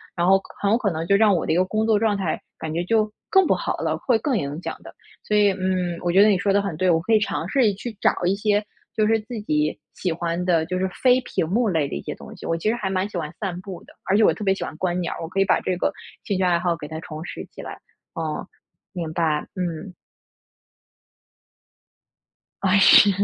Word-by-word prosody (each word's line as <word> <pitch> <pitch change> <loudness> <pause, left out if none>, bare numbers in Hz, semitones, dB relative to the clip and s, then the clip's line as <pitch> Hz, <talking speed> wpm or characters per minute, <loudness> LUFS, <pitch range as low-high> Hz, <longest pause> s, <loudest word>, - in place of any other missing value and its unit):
然 175 0 +1
后 195 +1 +6
可 195 - -12
很 200 - +2
有 225 - +4
可 215 -5 0
能 165 0 -4
就 200 - +4
让 205 -1 +5
我 170 - 0
的 - - +1
一 - - +2
个 180 +1 +3
工 215 +3 -1
作 220 -2 +4
状 215 -1 +1
态 190 -5 -2 0.2
感 160 - -4
觉 170 +2 -1
就 215 +2 +1 0.2
更 385 -3 +5
不 - - +4
好 - - -2
了， - - -1
会 245 -3 +2
更 260 +1 0
影 145 -1 -4
响 - - -5
的。 - - -11 0.3
所 210 - -1
以， 205 -1 +5
嗯， 185 -2 -1
我 175 - +1
觉 190 +3 +6
得 215 - +5
你 200 - +3
说 200 - +1
的 200 - +4
很 195 -5 -4
对， 185 +2 +2
我 165 -2 +4
可 225 +7 0
以 215 - +6
尝 185 -5 -2
试 245 -4 +3
去 220 +3 -7
找 - - +5
一 180 - +3
些 210 0 +1 0.3
就 215 - +2
是 225 0 +3
自 225 +2 -7
己 150 -6 0 0.2
喜 180 - -2
欢 170 +1 -2
的， 165 -3 +2
就 185 +2 -3
是 190 0 0
非 255 +6 +3
屏 170 - -2
幕 220 +6 +1
类 160 -6 +1
的 - - -8
一 70 - -4
些 - - -6
东 - - -12
西。 - - -11
我 165 - 0
其 165 - -3
实 - - +2
还 210 -5 -3
蛮 190 +1 0
喜 205 - -6
欢 155 -3 -4
散 185 -4 -3
步 185 -2 -9
的， - - -18
而 195 - +2
且 220 - +4
我 - - +5
特 215 - -7
别 195 -1 +3
喜 - - -5
欢 - - -6
观 180 0 -1
鸟 170 - -2
儿， - - -8
我 165 - -4
可 190 - -2
以 195 - +4
把 - - +3
这 185 - -1
个 - - 0 0.3
兴 200 - -1
趣 190 - 0
爱 175 -1 +3
好 175 -1 0
给 155 -3 -8
它 160 +1 -6
重 155 -1 -7
拾 - - -7
起 - - -10
来。 - - -8 0.3
哦， 160 +1 -4 0.5
明 170 -4 -4
白， 160 -3 0
嗯。 180 0 -4 2.7
啊， 195 +1 +4
是。 200 +1 +8
185 Hz, 280 characters per minute, -23 LUFS, 170-210 Hz, 2.7 s, 是